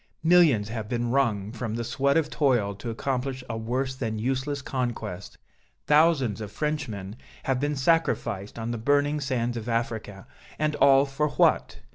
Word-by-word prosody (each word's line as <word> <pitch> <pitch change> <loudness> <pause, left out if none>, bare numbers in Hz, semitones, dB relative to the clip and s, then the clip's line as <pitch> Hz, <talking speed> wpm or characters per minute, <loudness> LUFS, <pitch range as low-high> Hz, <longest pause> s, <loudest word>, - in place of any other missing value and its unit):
Millions 160 -11 +5
have 110 -2 -5
been 120 -1 -1
wrung 110 -7 +1
from 115 -2 -4
the 115 - -2
sweat 135 +5 +1
of 160 -2 +2
toil 125 -10 +1
to 105 +4 -7
accomplish 130 +2 -3
a 115 - -4
worse 125 +4 -2
than 115 -4 -3
useless 135 +4 -2
conquest, 115 -8 -4 0.5
thousands 150 -8 +3
of 105 -2 -6
Frenchmen 115 -11 -3 0.3
have 135 -1 0
been 145 +2 -1
sacrificed 130 - 0
on 115 +1 -3
the 120 - -3
burning 145 +4 +2
sands 120 -4 -1
of 115 +1 -5
Africa, 110 -4 -3 0.3
and 155 0 0
all 135 0 +6
for 145 +2 -1
what? 140 - +2
125 Hz, 160 wpm, -26 LUFS, 110-140 Hz, 0.5 s, all